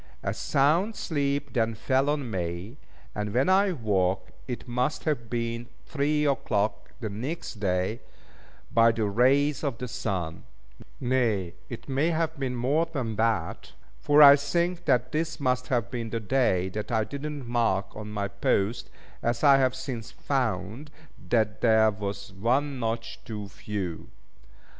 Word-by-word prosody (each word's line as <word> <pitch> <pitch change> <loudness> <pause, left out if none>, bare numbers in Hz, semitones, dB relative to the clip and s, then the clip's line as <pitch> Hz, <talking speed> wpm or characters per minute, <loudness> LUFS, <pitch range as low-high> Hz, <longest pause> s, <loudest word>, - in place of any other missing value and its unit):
A - - -1
sound 165 +11 +2
sleep 140 -3 -1
then 115 -1 +1
fell 130 +5 +1
on 145 -5 -1
me, 90 - -4 0.4
and 105 +1 -3
when 130 +7 +3
I 195 +1 +4
woke 100 - 0 0.2
it 125 0 -5
must 125 +5 -1
have 120 -8 -1
been 115 0 -2 0.2
three 150 +1 0
o'clock 110 -7 0
the 110 - -2
next 125 +2 -5
day, 95 +3 0 0.7
by 115 0 +6
the 115 -1 -1
rays 135 +8 +3
of 140 -6 -1
the 125 - -5
sun: 90 -8 -3 0.5
nay, 115 -9 +1 0.2
it 120 - -8
may 140 +4 +1
have 160 -2 -1
been 130 -2 -2
more 140 +7 +1
than 130 -9 -3
that; 115 -1 -1 0.3
for 145 +1 +6
I 140 0 +10
think 170 +5 -1
that 125 -3 +2
this 160 +1 -2
must 130 -2 0
have 120 -2 0
been 120 -3 -3
the 115 - -2
day 100 -5 +1
that 105 +4 -5
I 110 -1 +2
did 140 +6 -6
not 150 -3 -5
mark 115 -5 0
on 105 0 -7
my 100 -1 -2
post, 100 +2 0 0.3
as 120 0 -1
I 140 -2 +7
have 130 -1 +2
since 130 -3 -5
found 130 +1 -2 0.4
that 110 -3 +1
there 110 -2 +5
was 100 -1 -6
one 130 +7 0
notch 115 -1 -3
too 105 -3 -6
few. 95 -4 -5
120 Hz, 155 wpm, -27 LUFS, 105-140 Hz, 0.7 s, I